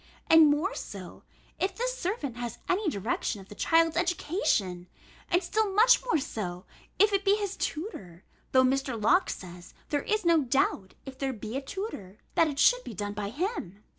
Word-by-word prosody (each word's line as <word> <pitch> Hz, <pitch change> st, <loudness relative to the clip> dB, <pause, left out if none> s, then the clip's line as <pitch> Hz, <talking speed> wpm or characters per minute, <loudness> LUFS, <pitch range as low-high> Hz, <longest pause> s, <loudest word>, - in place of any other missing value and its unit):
And 320 Hz, -2 st, +8 dB
more 310 Hz, +9 st, +1 dB
so, -, -, -8 dB, 0.4 s
if 380 Hz, -, -1 dB
this -, -, -2 dB
servant 360 Hz, -, -3 dB
has 240 Hz, -2 st, -5 dB
any 375 Hz, 0 st, +1 dB
direction 210 Hz, -2 st, -2 dB
of 195 Hz, -, -14 dB
the -, -, -9 dB
child's 330 Hz, +6 st, +3 dB
education; 315 Hz, -, 0 dB, 0.4 s
and 355 Hz, +1 st, +2 dB
still 435 Hz, -1 st, 0 dB
much 485 Hz, +4 st, +6 dB
more 485 Hz, -8 st, +1 dB
so, 185 Hz, -9 st, -5 dB, 0.3 s
if 415 Hz, 0 st, +4 dB
it 395 Hz, 0 st, +2 dB
be 395 Hz, 0 st, +4 dB
his 405 Hz, -2 st, -3 dB
tutor, 205 Hz, -, -5 dB, 0.3 s
though 260 Hz, 0 st, +5 dB
Mr. 260 Hz, -2 st, 0 dB
Locke 345 Hz, -, +3 dB
says, 175 Hz, -1 st, -8 dB
there 290 Hz, -1 st, 0 dB
is 430 Hz, +2 st, -1 dB
no 335 Hz, -2 st, +5 dB
doubt, 245 Hz, -7 st, 0 dB
if 265 Hz, -1 st, -10 dB
there 270 Hz, -1 st, -1 dB
be 215 Hz, +1 st, -7 dB
a 270 Hz, -, -1 dB
tutor, 270 Hz, -, -6 dB, 0.2 s
that 330 Hz, -, +4 dB
it 290 Hz, -2 st, -4 dB
should -, -, +4 dB
be 225 Hz, -, -8 dB
done 205 Hz, +2 st, -4 dB
by 205 Hz, -1 st, -4 dB
him. 235 Hz, -, -4 dB
290 Hz, 185 wpm, -28 LUFS, -, 0.4 s, And